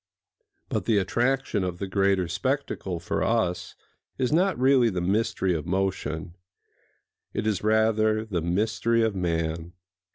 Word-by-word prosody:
But - - -2
the 110 -3 +3
attraction 120 +1 0
of 90 -1 -3
the 100 - -3
greater 95 -1 +1
spectacle 95 - -2
for 85 - -2
us 110 -6 0 0.4
is 130 -2 0
not 185 +3 +2
really 130 -2 +4
the 90 -4 -2
mystery 100 +1 0
of 80 0 -3
motion: 90 -3 -2 1.0
it - - -1
is 105 -4 0
rather 110 0 +2
the 95 -6 -2
mystery 110 +6 +1
of 110 -2 +1
man. 85 -2 -2
100 Hz, 135 wpm, -26 LUFS, 90-115 Hz, 1.0 s, really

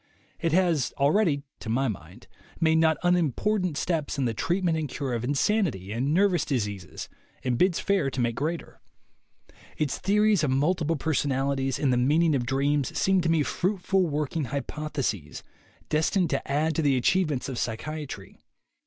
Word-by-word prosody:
It 165 - 0
has 170 -6 +2
already, 145 0 +2 0.2
to 110 - -7
my 130 +4 +1
mind, 90 -6 -7 0.3
made 160 0 +3
not 160 -1 +3
unimportant 180 - +1
steps 155 -4 -1
in 135 - 0
the 115 - 0
treatment 175 - 0
and 155 -3 -2
cure 135 -3 -3
of 115 -1 -2
insanity 140 - 0
and 125 +6 -1
nervous 185 +1 +3
diseases, 105 - -3 0.4
and 125 -2 0
bids 180 +6 +2
fair 195 -8 +1
to 130 - -5
make 120 -1 +1
greater. 160 +7 -4 1.0
Its 150 -3 -1
theories 210 -1 +3
of 150 - +2
multiple 160 +4 +1
personalities 135 -3 0
and 135 -3 +1
the - - +2
mean 145 +7 +3
ing 160 -3 +3
of 120 -3 -1
dreams 140 +1 0
seem 190 -1 +3
to 165 - 0
me 160 -2 +3
fruitful 185 - 0
working 150 0 -2
hypoth 150 +3 -5
eses, 105 - -2 0.4
destined 165 +4 +1
to 135 0 -2
add 155 +3 +1
to 160 - 0
the 140 -3 +2
achievements 155 0 +1
of 130 -3 -5
psychia 150 +7 -3
try. 95 -6 -9
150 Hz, 170 wpm, -26 LUFS, 130-170 Hz, 1.0 s, made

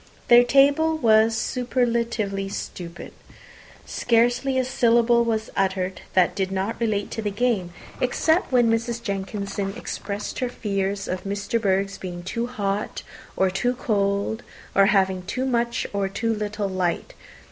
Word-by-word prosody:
Their 240 0 +8
table 285 +5 +4
was 225 -3 +4
superlatively 235 -5 -1
stupid. 175 -3 -7 0.7
Scarcely 245 +3 +1
a 260 - +2
syllable 235 -1 +3
was 220 -1 -2
uttered 190 -1 -1
that 185 -1 +4
did 190 0 -2
not 195 +5 -2
relate 210 -3 0
to 225 - -3
the 210 - -1
game, 205 -4 0 0.3
except 315 +7 +1
when 245 -2 +4
Mrs. 230 +1 -1
Jenkinson 200 -1 -3
expressed 205 -3 -5
her 250 - -1
fears 200 -3 -2
of 185 0 -3
Miss 200 +1 -4
De 230 - +1
Bourgh's 195 -1 0
being 175 -2 -6
too 230 +6 -3
hot 205 -4 -3 0.3
or 190 -1 +3
too 245 +6 0
cold, 200 -1 0 0.3
or 195 0 +5
having 190 -2 +2
too 255 +8 -3
much 235 -2 0
or 200 -1 0
too 225 +3 -1
little 210 -1 -2
light. 185 -2 -2
215 Hz, 145 wpm, -24 LUFS, 195-240 Hz, 0.7 s, Their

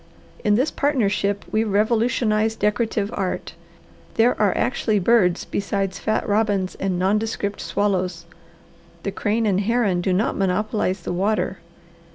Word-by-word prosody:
In 210 0 +3
this 260 +7 +1
partnership 205 -8 0
we 220 - +2
revolutionize 220 +1 +1
decorative 210 0 0
art. 190 -3 -3 0.6
There 235 +2 +4
are 205 -3 +2
actually 235 -4 +1
birds 195 -3 +3
besides 195 -1 -2
fat 215 0 -1
robins 205 -3 +1
and 190 -2 -2
nondescript 205 +2 -1
swallows. 185 -4 -1 0.8
The 200 - -2
crane 215 +3 0
and 200 -2 +2
heron 210 -4 +1
do 185 - 0
not 190 +5 +1
monopolize 195 0 0
the 175 - -4
water. 195 +1 0
205 Hz, 130 wpm, -22 LUFS, 195-220 Hz, 0.8 s, There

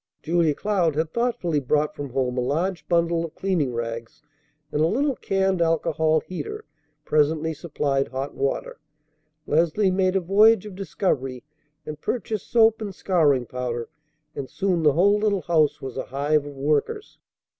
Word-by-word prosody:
Julia 165 -2 +2
Cloud 185 -6 0
had 160 +1 -1
thoughtfully 230 -10 0
brought 150 +3 0
from 145 -1 -5
home 125 -1 -1
a 125 - 0
large 160 +5 -1
bundle 170 -1 +2
of 165 - -7
cleaning 175 -9 0
rags, 115 +2 -5 0.5
and 150 - 0
a 160 - +4
little 270 - +1
canned 190 -3 0
alcohol 160 -1 +2
heater 175 -5 -6 0.4
presently 155 +1 +1
supplied 140 -3 -1
hot 135 +4 -5
water. 140 0 -2 0.7
Leslie 170 +5 +2
made 185 0 +1
a - - +4
voyage 205 +4 +4
of 210 - -8
discovery, 145 -9 -2 0.4
and 150 0 -7
purchased 220 -4 -3
soap 225 -1 +4
and 200 -3 -5
scouring 150 -11 +2
powder; 120 -1 -4 0.5
and 135 -2 -5
soon 185 +1 0
the 150 -3 +4
whole 200 +6 +4
little 205 -3 0
house 155 -5 +2
was 130 -1 -6
a - - -3
hive 145 +2 0
of 145 - -9
workers. 150 - -1
160 Hz, 155 wpm, -24 LUFS, 140-190 Hz, 0.7 s, a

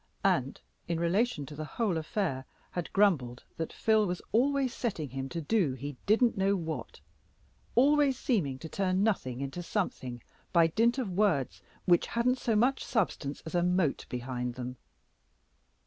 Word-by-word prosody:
and, - - +1 0.3
in 170 -1 -1
relation 170 - +1
to 150 - -9
the 155 - -4
whole 215 -7 +1
affair, 160 -4 -1 0.3
had 175 -2 -4
grumbled 145 -12 +2
that 160 - -3
Phil 220 -2 +2
was 180 0 -2
always 265 +2 +2
setting 165 - -3
him 135 0 -4
to 170 - -4
do 165 -3 +1
he 140 +2 -6
didn't 230 +3 +4
know 195 +1 +2
what 165 -4 -5 0.8
always 280 +1 +4
seeming 165 - 0
to 160 - -8
turn 185 +2 0
nothing 135 - 0
into 140 +5 -4
something 130 - -3 0.3
by 170 -2 +5
dint 230 - +2
of 240 -8 -2
words 150 - +1 0.2
which 175 -1 +4
hadn't 250 +2 +1
so 230 - 0
much 250 +5 +2
substance 165 - -1
as 160 - -7
a 175 - +3
mote 180 -4 +1
behind 125 0 -3
them. 125 0 -5
175 Hz, 160 wpm, -30 LUFS, 140-220 Hz, 0.8 s, by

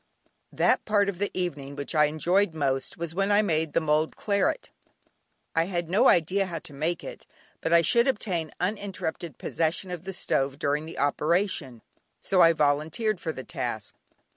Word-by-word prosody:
That - - +2
part 205 -2 +2
of 185 -3 -5
the 205 - 0
evening 145 -6 -4
which 140 0 -5
I 150 -1 +5
enjoyed 170 +4 +1
most 135 -3 -1
was 165 -1 -4
when 195 +3 0
I 205 +1 +5
made 160 -5 0
the - - +3
mulled 155 0 +1
claret. 200 - 0 0.8
I 165 0 +3
had 175 -2 -3
no 225 +8 +5
idea 185 +4 +2
how 170 -2 -4
to 150 - -9
make 160 +4 -2
it, - - -9 0.3
but 165 - -2
I 170 0 +6
should 235 - +3
obtain 185 -10 -1
uninterrupted 180 - -3
possession 165 +3 -1
of 180 0 -6
the 195 - -4
stove 135 -6 0
during 145 +2 -1
the 165 - -9
operation, 150 - 0 0.4
so 185 -2 +2
I 165 - +8
volunteered 155 +8 0
for 160 - -3
the 130 - -7
task. - - -4
165 Hz, 175 wpm, -27 LUFS, 150-195 Hz, 0.8 s, I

